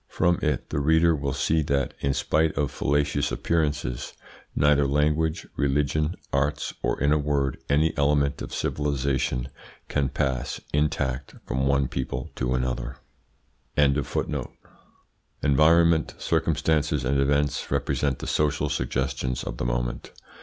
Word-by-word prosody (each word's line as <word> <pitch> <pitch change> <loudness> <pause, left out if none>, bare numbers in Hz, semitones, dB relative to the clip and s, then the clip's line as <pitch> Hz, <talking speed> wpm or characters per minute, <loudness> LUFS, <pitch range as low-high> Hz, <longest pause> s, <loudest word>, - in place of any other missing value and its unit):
From 85 0 +1
it 75 -5 -1
the - - 0
reader 80 +3 +4
will 70 -1 -2
see 75 +5 +1
that, 70 -2 0
in 70 -1 0
spite 80 -1 +1
of 70 -1 0
fallacious 70 0 0
appearances, 75 -7 -1 0.4
neither 70 -1 +4
language, 75 +3 +1
religion, 75 +3 +1 0.2
arts, 70 +1 0
or, - - -1
in 70 +2 +2
a 75 - +2
word, 70 -3 0
any 75 +3 +2
element 70 -1 +1
of - - -6
civilisation, 65 -3 -1 0.4
can 70 -2 0
pass, 65 -1 -2
intact, 70 -3 -1
from 65 +2 0
one 70 -1 +2
people 65 -1 -4
to 65 0 0
another. 65 0 -2 0.8
Environment, 70 -1 0 1.7
circumstances, 75 -3 +1
and 70 +2 +1
events 70 +1 +1
represent 70 -3 0
the - - -7
social 75 -2 +1
suggestions 65 0 -2
of - - -5
the - - -3
moment. - - -2
70 Hz, 125 wpm, -25 LUFS, 65-75 Hz, 1.7 s, reader